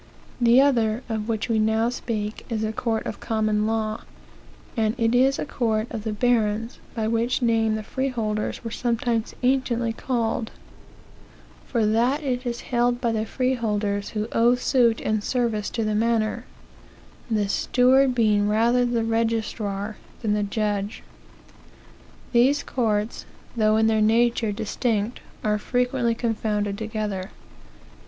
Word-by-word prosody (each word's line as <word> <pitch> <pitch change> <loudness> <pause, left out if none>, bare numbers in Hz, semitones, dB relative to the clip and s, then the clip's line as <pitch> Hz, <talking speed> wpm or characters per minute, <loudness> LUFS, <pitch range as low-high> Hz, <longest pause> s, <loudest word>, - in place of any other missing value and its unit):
The 240 +1 +6
other, 240 -4 +2
of 220 0 -3
which 220 -1 -1
we 225 -2 +1
now 220 +2 +2
speak, 220 -3 -4
is 220 -2 -1
a 215 0 -1
court 225 0 -1
of - - -5
common 215 -1 0
law, 220 -1 -1 0.7
and 220 0 +1
it 230 -1 +1
is 265 +2 +4
a - - -3
court 220 -6 0
of 220 -2 -5
the 220 - -1
barons, 225 0 0 0.2
by 220 -2 -1
which 230 +3 0
name 225 -2 +2
the 215 - -4
freeholders 225 -5 -2
were 230 - -5
sometimes 235 -1 -1
anciently 245 -3 +1
called; 230 -2 -1 1.2
for 230 -4 +1
that 240 +8 +2
it 255 -2 -2
is 240 0 -3
held 240 0 +1
by 235 -2 0
the 220 0 -1
freeholders 210 -6 -1
who 210 +1 -1
owe 235 +2 +4
suit 245 -3 +2
and 215 -1 -1
service 230 -4 -1
to 230 - -2
th 215 -1 0
manor, 220 0 0 0.8
the 210 -3 +1
steward 255 +5 +3
being 210 -3 +3
rather 235 +3 +3
the 235 -1 0
registrar 220 -2 -1 0.3
than 210 -2 +1
the 210 - +1
judge. 205 0 -2 1.3
These 265 +4 +4
courts, 220 -3 -1 0.3
though 215 -1 +3
in 220 - +3
their 220 -1 +3
nature 230 0 +3
distinct, 220 +1 -1 0.2
are 210 -1 +1
frequently 245 0 0
confounded 210 -3 -1
together. 210 -3 -4
225 Hz, 140 wpm, -24 LUFS, 215-240 Hz, 1.3 s, The